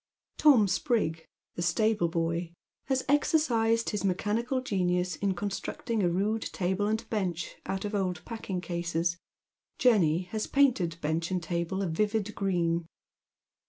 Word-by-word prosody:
Tom 260 -9 +6
Sprig, 185 - 0 0.3
the - - -5
stable 215 +1 +2
boy, 165 0 -2 0.3
has 265 -1 0
exercised 235 -6 +2
his 210 - -2
mecljanical 220 +7 0
genius 180 -5 0
in 195 -2 0
constructing 205 +3 -3
a 180 - +3
rude 205 +5 0
table 190 +1 -1
and 220 +1 -1
bench 180 -6 -2
out 190 +1 -2
of 205 - -4
old 180 -4 -1
packing 205 -6 -4
cases 170 0 -1 0.3
— - - -57
Jenny 185 -9 +4
has 215 -1 -2
painted 235 - +2
bench 160 +3 -1
and 185 -2 -1
table 170 +3 -2
a - - 0
vivid 210 +5 0
green. 170 -4 0
190 Hz, 140 wpm, -29 LUFS, 170-220 Hz, 0.3 s, Tom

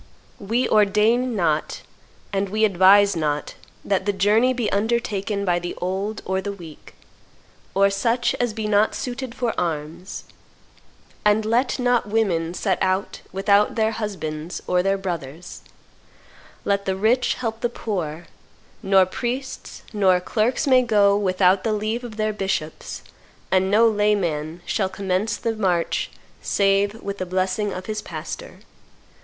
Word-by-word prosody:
We 230 +5 0
ordain 215 +4 +3
not, 160 -5 0 0.5
and 195 0 0
we 215 +2 +2
advise 200 +1 +5
not, 150 -2 -2 0.3
that 195 0 0
the - - +4
journey 210 +6 +3
be 245 -4 -1
undertaken 210 -2 -1
by 175 -2 +2
the 175 0 -5
old 195 +4 -3
or 190 +1 -1
the 200 - -4
weak, 170 -6 -12 0.8
or 200 0 +4
such 230 +5 +1
as 245 -2 +1
be 215 0 -4
not 210 +1 +3
suited 250 -1 -5
for 240 -3 -1
arms, 165 +2 -4 1.0
and 210 +1 +3
let 240 +4 +1
not 245 -4 +1
women 180 -6 0
set 190 -2 -1
out 190 +1 -1
without 200 +2 +2
their 220 -1 +2
husbands 180 -7 -4
or 180 0 +2
their 195 +1 +1
brothers; 170 -4 -6 1.0
let 200 0 0
the 190 - 0
rich 225 +6 +2
help 225 -3 -4
the 240 - +1
poor; 175 -8 -4 0.6
nor 195 -1 +4
priests 250 +7 -5
nor 190 -3 +4
clerks 220 +9 0
may 260 -2 +5
go 205 -4 +4
without 185 -1 +2
the 220 - 0
leave 215 +3 -2
of 225 -3 -8
their 215 0 0
bishops; 190 -6 -4 0.5
and 190 0 +3
no 220 +3 +5
layman 180 -7 0
shall 195 -3 0
commence 195 +2 -1
the 230 -1 -2
march 180 -5 0 0.3
save 200 +2 +1
with 200 0 -5
the - - -1
blessing 190 +3 -1
of 185 0 -6
his 215 -1 -3
pastor. - - -8
200 Hz, 145 wpm, -23 LUFS, 185-220 Hz, 1.0 s, advise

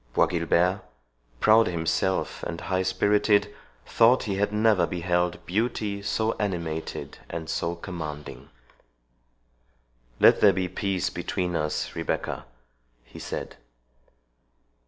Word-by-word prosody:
Bois - - +5
Guilbert, 90 +3 +1 0.6
proud 110 - +5
himself 85 +2 -1
and 85 -1 -5
high 95 -1 -1
spirited, 105 +2 +2 0.3
thought 120 +3 +4
he 100 -5 -2
had 105 +1 +1
never 105 -5 +3
beheld 90 0 -1
beauty 105 0 -1
so 110 +2 0
animated 85 -6 -4
and 85 -1 -5
so 85 +1 -2
commanding. 80 -5 -7 1.7
"Let - - +6
there 100 -2 +7
be 95 0 -1
peace 95 -1 -2
between 90 -2 -2
us, 75 -1 -2
Rebecca," - - -3 0.6
he - - -13
said. - - -6
95 Hz, 110 wpm, -26 LUFS, 85-105 Hz, 1.7 s, there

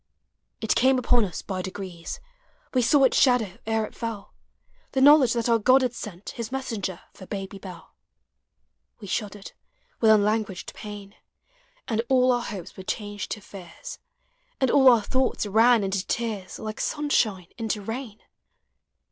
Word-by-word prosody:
It 220 - +2
came 260 +1 +4
upon 245 -2 +3
us 180 - -6
by 190 -2 -3
degrees, 185 - -7 0.5
We 255 - +3
saw 270 +4 +4
its 260 - +4
shadow 245 -8 +2
ere 220 -1 +1
it - - -12
fell 230 -4 -6 0.3
— - - -38
The 265 - +1
knowledge 280 -3 +7
that 235 -1 -1
our 230 -1 +3
God 255 +4 +5
had 250 -2 0
sent 205 -5 -8
His 230 -1 -6
messenger 220 -9 -4
for 190 - -12
Baby 195 -1 -6
Dell. 185 -3 -11 1.1
We 210 - -10
shuddered 205 0 -4 0.5
with 225 - +4
uulanguaged 210 -2 +2
pain, 205 -1 -9 0.7
And 225 -1 0
all 255 -1 +4
our 245 -1 +1
hopes 200 -7 -7
were - - -8
changed 205 +1 -4
to 215 - -9
fears, 185 -4 -10 0.6
And 265 -2 +2
all 265 -2 +7
our 235 -4 +5
thoughts 260 -2 0
ran 225 +2 +4
into 195 -1 -1
tears 220 -5 -3
Like 215 0 -5
sunshine 220 - 0
into 220 -1 -1
rain. 225 +1 -6
220 Hz, 155 wpm, -25 LUFS, 200-245 Hz, 1.1 s, knowledge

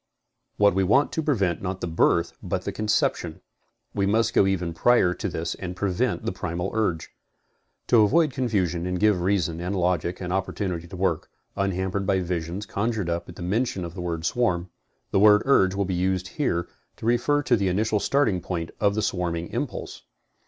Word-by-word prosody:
What 100 -2 +5
we 95 +1 +2
want 130 +10 +3
to 160 - -1
prevent 100 - 0
not 95 0 -3
the - - -3
birth 85 0 +2
but - - -3
the - - -3
conception. 105 0 0 0.5
We 100 -1 0
must 110 +2 +2
go 95 - +4
even 90 -3 -1
prior 90 0 +3
to - - -4
this 80 +1 -3
and 90 -1 -6
prevent 95 -2 -1
the - - 0
primal 90 +3 -3
urge. 100 -8 -1 0.7
To 115 - +5
avoid 150 +8 +4
confusion 95 - 0
and 90 0 -2
give 105 -4 +3
reason 90 -3 0
and 90 +3 -2
logic 90 -1 0
an 90 -1 -4
opportunity 95 -2 -2
to 90 - -9
work, 90 -4 -1 0.3
unhampered 95 0 -1
by 95 -2 +2
visions 90 +2 -3
conjured 105 -3 -2
up 85 +1 -3
at 90 - -11
mention 95 +1 -1
of 85 - -7
the 90 - -6
word 85 -1 -3
swarm, 90 -6 0 0.4
the - - +3
word 105 +1 +6
urge 95 -9 +4
will 100 0 0
be 95 - -2
used 95 +1 0
here 85 - -1 0.3
to - - -8
refer 120 +5 +2
to 125 - +3
the 100 -3 0
initial 105 +3 +1
starting 130 -10 +1
point 85 -2 -4
of 100 -1 +2
the 110 - 0
swarming 85 -3 -2
impulse. - - -5
95 Hz, 190 wpm, -25 LUFS, 90-105 Hz, 0.7 s, word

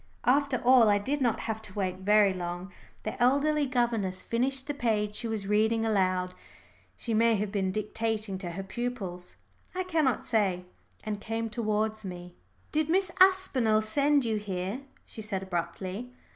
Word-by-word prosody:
After 275 +1 +3
all, 250 -3 +7
I 205 - +4
did 275 +8 -2
not 240 -3 +1
have 220 -1 -3
to 205 -4 -7
wait 185 -3 -1
very 205 0 +4
long. 175 +1 -5 0.3
The 215 - -5
elderly 285 +3 +3
governess 235 -7 0
finished 260 +3 0
the 290 - -3
page 215 -6 0
she 235 - -3
was 220 -3 -3
reading 220 +2 +2
aloud 185 -4 +1 0.6
she 230 - -3
may 230 +1 +4
have 205 -1 -2
been 195 -2 0
dictating 215 -1 -2
to 175 -3 -5
her 195 +3 -5
pupils, 195 -4 -5 0.4
I 370 - 0
cannot 315 -8 +1
say 195 -6 +1 0.4
and 210 -1 -4
came 225 0 -3
towards 215 0 -1
me. 180 -2 -7 0.4
"Did 310 0 +1
Miss 370 +1 +2
Aspinall 280 - +4
send 280 +4 +2
you 220 -2 0
here?" 195 +2 -3 0.3
she 220 - -9
said 200 -3 -3
abruptly. 190 +5 -4
220 Hz, 160 wpm, -29 LUFS, 195-250 Hz, 0.6 s, all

